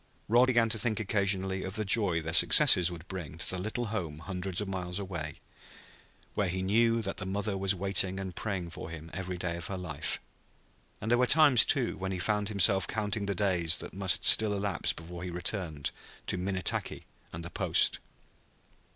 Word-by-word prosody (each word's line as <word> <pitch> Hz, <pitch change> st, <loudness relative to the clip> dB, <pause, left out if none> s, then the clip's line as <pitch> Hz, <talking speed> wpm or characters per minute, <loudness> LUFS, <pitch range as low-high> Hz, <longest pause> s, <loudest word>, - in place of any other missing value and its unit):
Rod 120 Hz, +4 st, +4 dB
began 120 Hz, -3 st, +3 dB
to 110 Hz, -, +2 dB
think 110 Hz, 0 st, +2 dB
occasionally 95 Hz, -3 st, -1 dB
of 95 Hz, +1 st, -5 dB
the 110 Hz, -, -1 dB
joy 95 Hz, -5 st, +1 dB
their 80 Hz, +1 st, -4 dB
success 85 Hz, +1 st, +6 dB
would 85 Hz, 0 st, -10 dB
bring 85 Hz, -5 st, -7 dB
to 85 Hz, -, +1 dB
the 90 Hz, -, +5 dB
little 110 Hz, +5 st, -3 dB
home 85 Hz, -8 st, -4 dB
hundreds 90 Hz, +2 st, -4 dB
of 105 Hz, -, -3 dB
miles 90 Hz, -2 st, -4 dB
away, 85 Hz, -7 st, -5 dB, 1.0 s
where 100 Hz, -3 st, -1 dB
he 95 Hz, +1 st, -3 dB
knew 115 Hz, +3 st, +2 dB
that 100 Hz, -, -1 dB
the 95 Hz, -, -5 dB
mother 100 Hz, +1 st, -2 dB
was 95 Hz, 0 st, 0 dB
waiting 95 Hz, 0 st, 0 dB
and 95 Hz, -2 st, -6 dB
praying 95 Hz, -6 st, -4 dB
for 80 Hz, -, -8 dB
him 80 Hz, 0 st, -9 dB
every 90 Hz, 0 st, -5 dB
day 85 Hz, -1 st, -3 dB
of 85 Hz, -, -6 dB
her 95 Hz, -, -5 dB
life; 75 Hz, -6 st, -4 dB, 0.8 s
and 110 Hz, -, -4 dB
there 120 Hz, -, +3 dB
were 125 Hz, -, +3 dB
times, 145 Hz, -5 st, +6 dB
too, 130 Hz, -4 st, 0 dB
when 95 Hz, 0 st, -4 dB
he 95 Hz, -, -3 dB
found 105 Hz, +3 st, -1 dB
himself 100 Hz, -2 st, +3 dB
counting 105 Hz, -1 st, -3 dB
the 100 Hz, -, -1 dB
days 90 Hz, -4 st, +1 dB
that -, -, -8 dB
must 95 Hz, -1 st, +1 dB
still 110 Hz, -1 st, +6 dB
elapse 100 Hz, 0 st, -1 dB
before 85 Hz, +1 st, -9 dB
he 90 Hz, -, -5 dB
returned 85 Hz, -4 st, -3 dB, 0.3 s
to -, -, -2 dB
Minnetaki 95 Hz, +1 st, -2 dB, 0.3 s
and 85 Hz, +1 st, -8 dB
the 85 Hz, -, -8 dB
Post. -, -, +2 dB
95 Hz, 195 wpm, -29 LUFS, 90-105 Hz, 1.0 s, success